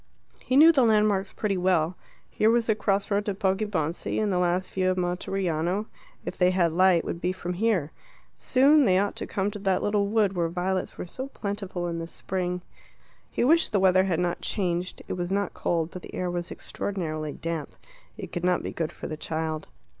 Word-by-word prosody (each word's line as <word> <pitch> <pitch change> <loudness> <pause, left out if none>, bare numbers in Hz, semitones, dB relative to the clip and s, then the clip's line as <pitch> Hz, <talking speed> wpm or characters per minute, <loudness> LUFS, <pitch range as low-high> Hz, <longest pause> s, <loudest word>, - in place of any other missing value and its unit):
He 260 - +1
knew 320 +3 +9
the 290 -5 +3
landmarks 210 -4 +3
pretty 200 -3 -1
well: 180 -2 +2 0.3
here 215 - +2
was 235 0 +3
the 220 - +3
crossroad 205 0 0
to 205 - -1
Poggibonsi; 190 -4 -1
and 210 -2 +1
the 180 - +1
last 180 +1 0
view 185 -1 +1
of 185 - 0
Monteriano, 180 +1 -1 0.4
if - - -4
they 180 -1 +4
had 175 -3 +2
light, 185 -1 +4
would 170 - -4
be 180 - +1
from 180 -1 -4
here. 185 -6 +1 0.4
Soon 280 +3 +4
they 185 -4 +4
ought 200 +1 0
to - - -5
come 200 +1 -1
to 205 - -7
that 190 -2 +1
little 205 -1 +1
wood 205 -2 +2
where 170 -3 0
violets 185 +2 -2
were - - -5
so 260 +9 -6
plentiful 200 -7 -4
in 165 -1 -3
spring. 180 0 -3 0.7
He - - -1
wished 325 +6 +4
the 205 - +2
weather 185 0 +4
had 175 -4 0
not 175 -1 -1
changed; 180 -2 -2
it - - -3
was 175 0 -3
not 200 -1 0
cold, 165 -1 -1
but 185 - -8
the - - -10
air 180 -1 -2
was 175 -1 -3
extraordinarily 155 -6 -4
damp. 165 -2 -5 0.4
It - - -7
could 175 - -4
not 180 0 +2
be - - -4
good 160 -2 -3
for - - -9
the 155 - -4
child. 160 0 -3
185 Hz, 200 wpm, -26 LUFS, 175-205 Hz, 0.7 s, knew